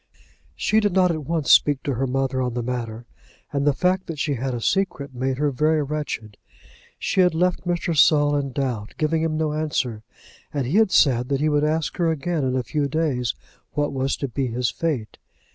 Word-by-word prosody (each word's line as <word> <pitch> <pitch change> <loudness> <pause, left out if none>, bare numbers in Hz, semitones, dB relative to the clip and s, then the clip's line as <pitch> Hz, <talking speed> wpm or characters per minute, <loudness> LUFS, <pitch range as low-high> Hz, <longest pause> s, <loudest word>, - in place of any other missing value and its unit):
She 215 - +2
did 205 -3 +1
not 185 -1 +4
at 155 -3 -4
once 160 -1 0
speak 145 -2 +5
to 140 - -1
her 130 +2 -1
mother 130 0 -1
on 125 -2 -2
the 120 - -2
matter, 120 -2 -4 0.5
and 140 0 0
the - - +6
fact 185 +5 0
that 165 - -5
she 145 +1 0
had 130 0 -2
a - - -3
secret 145 -2 -1
made 130 +1 -2
her 145 0 +1
very 155 +3 +2
wretched. 140 -8 -4 0.6
She 195 - +1
had 180 -2 +3
left 180 +1 0
Mr. 175 -1 -1
Saul 145 -1 +5
in 140 -2 -1
doubt, 125 -6 -3
giving 160 +1 +1
him 160 -1 0
no 155 -1 0
answer, 145 -8 -2 0.5
and 140 -3 -2
he 150 +11 +1
had 220 -2 +5
said 125 -8 +3
that 140 -1 +1
he 155 +2 +2
would 150 0 +2
ask 155 +1 -1
her 170 -2 +2
again 160 0 -1
in 130 -1 0
a 130 - 0
few 145 +2 -1
days 140 -6 -1 0.4
what 145 -1 -1
was 135 0 -1
to 140 - -3
be 130 +1 -2
his 120 0 -1
fate. 140 -10 -3
145 Hz, 210 wpm, -23 LUFS, 130-160 Hz, 0.6 s, the